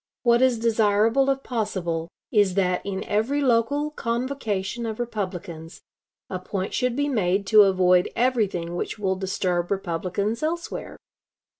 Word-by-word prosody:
What 240 0 +4
is 260 -2 +4
desirable, 225 +3 +2
if 270 0 0
possible, 180 -8 -2 0.2
is 205 -4 +3
that 180 -2 +1
in 195 -1 -4
every 225 +8 0
local 285 +3 +1
convocation 235 -4 -2
of 220 0 -5
Republicans 185 -8 -5 0.4
a 185 - -4
point 190 +1 -4
should 250 -2 0
be 285 +1 0
made 200 -6 +1
to 215 - +10
avoid 185 -2 +4
everything 210 -9 0
which 175 - -3
will 190 -2 0
disturb 185 -2 -1
Republicans 195 +4 -2
elsewhere. 335 +2 -4
210 Hz, 135 wpm, -24 LUFS, 185-240 Hz, 0.4 s, to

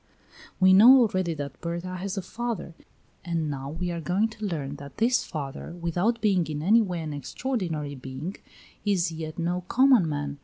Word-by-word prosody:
We 185 0 +6
know 245 +7 +9
already 185 -7 +1
that 140 -3 -7
Berta 170 +2 -4
has 195 +2 -4
a 195 - -2
father, 220 -4 -4 0.5
and 165 -4 -2
now 135 -1 -5
we 175 +4 -3
are 170 -1 -4
going 190 +7 +1
to 220 -1 -7
learn 145 -7 -3
that 140 -1 -11
this 240 +3 +2
father, 145 0 -6
without 180 +8 0
being 190 -6 +2
in 150 -1 -4
any 220 +6 +5
way 180 -5 -2
an 155 -2 -5
extraordinary 160 - -3
being, 135 +7 -6 0.5
is 190 -5 +1
yet 160 -1 -6
no 175 +1 -1
common 255 -9 +5
man. 145 -1 -4
175 Hz, 180 wpm, -26 LUFS, 150-200 Hz, 0.5 s, know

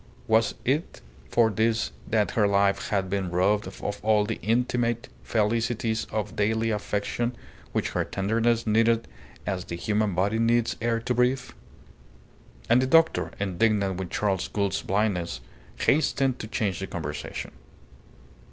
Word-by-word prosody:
Was 110 +1 +2
it 145 +6 0 0.3
for 115 -2 +3
this 110 +2 +1 0.2
that 110 -2 +1
her 105 -3 +3
life 100 0 +2
had 95 -2 0
been 95 -1 -1
robbed 95 +4 +2
of - - -10 0.2
all 105 -1 +3
the 115 +1 -3
intimate 120 0 0
felicities 115 +1 0
of 105 -1 -4
daily 110 +2 +1
affection 105 +3 -2 0.4
which - - -1
her - - 0
tenderness 115 +4 0
needed 115 +1 +3 0.4
as 95 -2 -2
the 85 - -5
human 105 +1 0
body 100 +5 +1
needs 115 0 +2
air 115 0 +1
to 125 - -1
breathe? 125 +1 +1 1.2
And 120 +2 +5
the 130 - +1
doctor, 165 +3 +4
indignant 100 0 +1
with 95 -2 -4
Charles 95 -2 0
Gould's 100 -2 -1
blindness, 95 - -1 0.4
hastened 135 -3 +2
to 110 - -5
change 105 -4 -1
the 95 - -4
conversation. 75 -4 -5
110 Hz, 140 wpm, -26 LUFS, 100-115 Hz, 1.2 s, And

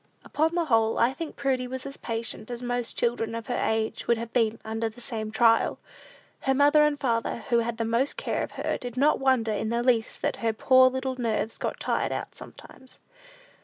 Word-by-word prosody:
Upon 320 +3 0
the 345 -1 +1
whole, 225 -5 +2
I 240 +3 +3
think 325 +2 -6
Prudy 260 -2 -1
was 260 +1 -6
as 275 - -5
patient 225 -2 -4
as 240 0 -5
most 245 -1 -3
children 230 -1 -1
of 230 0 -5
her 245 - -2
age 220 0 -1
would 235 - +3
have 230 0 -6
been 230 -2 +2
under 225 +1 -2
the 220 - -15
same 225 -3 -3
trial. 230 +1 +3 0.6
Her 270 0 +1
father 290 +2 +5
and 300 -1 +3
mother, 230 -2 -1
who 235 -1 +4
had 230 0 -2
the 230 - -1
most 235 +5 0
care - - -2
of - - -5
her, - - -2
did 245 0 -7
not 290 +4 +3
wonder 260 -5 +2
in 215 +1 -2
the 235 +1 0
least 240 -3 +1
that - - 0
her 225 -1 0
poor 255 +3 +5
little 260 0 -3
nerves 225 -2 -2
got - - -3
tired - - -1
out - - -4
sometimes. 260 -1 -13
235 Hz, 210 wpm, -26 LUFS, 225-260 Hz, 0.6 s, father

